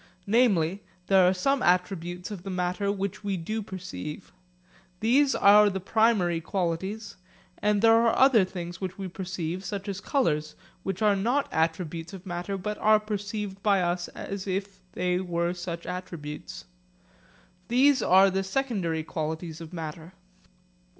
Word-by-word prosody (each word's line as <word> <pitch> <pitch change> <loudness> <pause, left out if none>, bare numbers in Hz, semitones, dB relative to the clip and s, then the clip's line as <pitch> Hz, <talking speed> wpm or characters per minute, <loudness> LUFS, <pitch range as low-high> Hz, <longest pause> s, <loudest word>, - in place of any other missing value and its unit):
Namely, 200 -5 +2 0.2
there 190 -2 +5
are - - +5
some 265 +9 +1
attributes 180 0 0
of 200 -4 -6
the 195 - -7
matter 185 +2 -1
which 200 0 -4
we 200 -2 -1
do 215 +7 -3
perceive. 180 - -7 0.7
These 270 +5 +3
are 210 +1 +7
the 190 -1 -3
primary 195 -4 +2
qualities, 190 +4 -3 0.4
and 210 0 +2
there 225 0 +7
are 230 0 +4
other 260 -6 +6
things 175 -1 -6
which 185 0 -4
we 195 -1 -4
perceive, 180 -1 -4
such 195 +1 -5
as 200 -1 -4
colours, 155 - 0 0.3
which 195 +2 -3
are 210 -1 +4
not 245 +9 +1
attributes 165 +1 -1
of 190 0 -9
matter, 180 +2 -4
but 210 +3 -4
are 215 0 +5
perceived 205 -1 -4
by 200 -2 +3
us 175 0 -1
as 200 0 -6
if 195 +1 -3
they 180 0 0
were 170 -1 -1
such 175 -1 -6
attributes. 170 -4 -7 1.0
These 260 +4 +4
are 190 +1 +5
the 190 +1 0
secondary 190 -8 -1
qualities 160 +1 -4
of 165 -1 -9
matter. 165 0 -7
190 Hz, 150 wpm, -27 LUFS, 175-205 Hz, 1.0 s, are